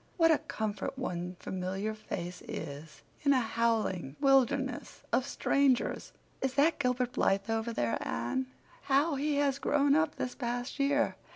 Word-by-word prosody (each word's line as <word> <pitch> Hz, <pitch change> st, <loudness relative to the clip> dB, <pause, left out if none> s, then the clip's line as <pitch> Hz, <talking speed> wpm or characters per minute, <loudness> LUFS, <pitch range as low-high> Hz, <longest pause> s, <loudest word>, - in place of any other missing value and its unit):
What 330 Hz, -2 st, +5 dB
a 315 Hz, -, +4 dB
comfort 215 Hz, +3 st, -4 dB
one 180 Hz, -7 st, -3 dB
familiar 190 Hz, +3 st, -3 dB
face 180 Hz, -4 st, -6 dB
is 150 Hz, 0 st, -7 dB, 0.2 s
in 280 Hz, -1 st, +4 dB
a 260 Hz, -, +4 dB
howling 225 Hz, -, 0 dB
wilderness 270 Hz, -1 st, +2 dB
of 260 Hz, -, +2 dB
strangers!" 275 Hz, -2 st, +1 dB, 0.3 s
"Is 265 Hz, -1 st, -1 dB
that 300 Hz, +4 st, +3 dB
Gilbert 250 Hz, -1 st, +1 dB
Blythe 200 Hz, 0 st, +1 dB
over 225 Hz, +1 st, -1 dB
there, 120 Hz, -, 0 dB
Anne? 120 Hz, -, -2 dB, 0.4 s
How 285 Hz, +4 st, +3 dB
he 290 Hz, +2 st, 0 dB
has 280 Hz, -1 st, +1 dB
grown 285 Hz, 0 st, +3 dB
up 315 Hz, 0 st, +2 dB
this 250 Hz, -, -3 dB
past 245 Hz, +1 st, -4 dB
year! 285 Hz, +1 st, +2 dB
250 Hz, 150 wpm, -31 LUFS, 200-280 Hz, 0.4 s, What